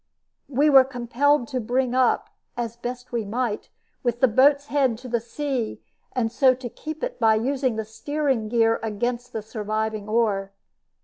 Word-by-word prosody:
We 285 +2 +3
were 270 -3 +8
compelled 255 +1 +1
to 260 - -2
bring 250 +2 0
up 255 -1 +2 0.3
as 235 -1 -3
best 245 +1 -6
we 235 -2 -1
might 225 +1 -2 0.3
with 240 -1 -1
the 260 - +5
boat's 280 +5 +4
head 270 -5 +1
to 250 +2 -10
the 240 -1 0
sea, 245 0 -3 0.3
and 230 -4 0
so 255 +1 +4
to 250 -1 -7
keep 310 +6 -7
it - - -3
by 220 -1 +5
using 260 +1 0
the 220 0 -3
steering 255 +1 -1
gear 225 -1 +3
against 240 +3 -3
the 220 - -4
surviving 215 -1 -3
oar. 205 -4 +1
240 Hz, 170 wpm, -24 LUFS, 220-265 Hz, 0.3 s, were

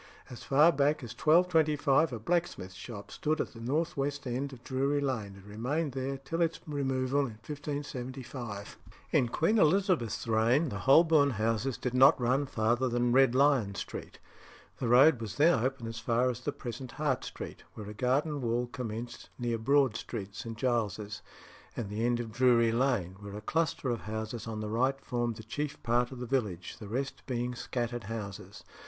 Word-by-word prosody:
As 120 - -8
far 150 +5 +5
back 145 0 +1
as 120 - -7
1225 160 -3 +3
a 120 - -3
blacksmith's 140 - -1
shop 100 +2 -9
stood 155 +1 -1
at - - -2
the 115 - -11
north 145 +8 -1
west 145 +1 -2
end 130 +3 -2
of 125 -3 -12
Drury 140 +2 0
Lane, 115 -8 -2
and 100 - -14
remained 130 +9 -2
there 135 +1 -3
till 135 +6 -4
its 165 -1 +1
removal 135 -2 0
in 120 -6 -2
1575. 130 -6 -6 0.3
In 120 - +3
Queen 210 - +2
Elizabeth's 165 - +2
reign 115 +8 +3
the 100 - -5
Holborn 145 - +5
houses 115 +2 -1
did 125 - -3
not 130 +2 +6
run 130 +4 +1
farther 120 +3 +1
than 120 0 +1
Red 130 -1 +5
Lion 130 -8 +3
Street; - - -7 0.6
the 125 - -1
road 125 +2 +6
was 110 -2 -5
then 145 -6 +4
open 130 -2 -2
as 115 0 -5
far 120 +3 +2
as 120 - -7
the 135 +4 -2
present 125 0 -7
Hart 145 -4 -1
Street, - - -7
where 105 -2 -7
a 105 - -6
garden 140 +6 0
wall 120 0 0
commenced 120 -1 -6
near 120 -2 -1
Broad 135 0 +3
Street, 100 -3 -5
St. 115 +3 -6
Giles's, 110 -5 -1 0.6
and 105 -4 -4
the 110 +2 -2
end 120 0 +2
of 115 -2 -5
Drury 120 -1 +4
Lane, 115 -7 0
where 100 -1 -8
a 105 - -6
cluster 155 0 0
of 120 - -2
houses 110 +2 -5
on 110 -1 -4
the 105 - -3
right 130 +5 +1
formed 120 -3 -2
the 110 - -9
chief 145 +6 -4
part 120 +1 +1
of 130 - -7
the 125 - -4
village, 105 -9 -2
the 105 - -8
rest 135 +6 -3
being 125 -1 -2
scattered 120 -2 -3
houses. 100 -2 -7
125 Hz, 185 wpm, -30 LUFS, 115-140 Hz, 0.6 s, not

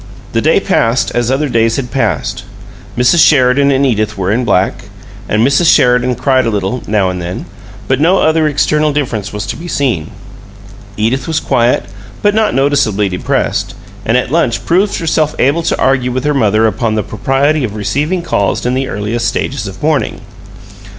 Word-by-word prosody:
The - - +1
day - - +3
passed 115 +3 +1
as 120 -1 0
other 140 +3 0
days 115 -2 +1
had 125 -3 -4
passed. 135 - -2 0.5
Mrs. 125 +7 +4
Sheridan 140 -1 +4
and 140 0 +2
Edith 110 -4 -1
were 95 0 -1
in 120 +4 0
black, 100 -4 0 0.4
and 110 +2 +2
Mrs. 150 +5 +4
Sheridan 125 0 +3
cried 130 0 +1
a - - +2
little, 105 +3 -2
now 100 -3 +1
and 90 -1 -5
then, 90 +1 -5 0.4
but 130 +1 0
no 180 +5 +4
other 160 -2 +2
external 150 +1 +1
difference 120 -9 -3
was 105 0 -5
to - - -4
be 170 - -8
seen. 120 - -1 0.9
Edith 115 +8 -1
was 160 -1 0
quiet, 120 +1 +1 0.4
but 205 0 +3
not 220 0 +1
noticeably 135 -8 +1
depressed, 90 - -2 0.3
and 115 +4 +1
at 125 0 -2
lunch 150 -8 0
proved 195 +4 +1
herself 155 -2 0
able 145 +6 +2
to - - -1
argue 130 -2 +1
with 130 +1 -2
her 150 - +1
mother 110 -4 +2
upon 110 +1 0
the 105 - -1
propriety 135 +7 0
of 105 -4 -4
receiving 145 - -1
calls 100 - -1
in 125 - 0
the 130 +1 -1
earliest 115 +2 -2
stages - - -3
of - - -10
"mourning." - - 0
125 Hz, 180 wpm, -13 LUFS, 110-145 Hz, 0.9 s, Mrs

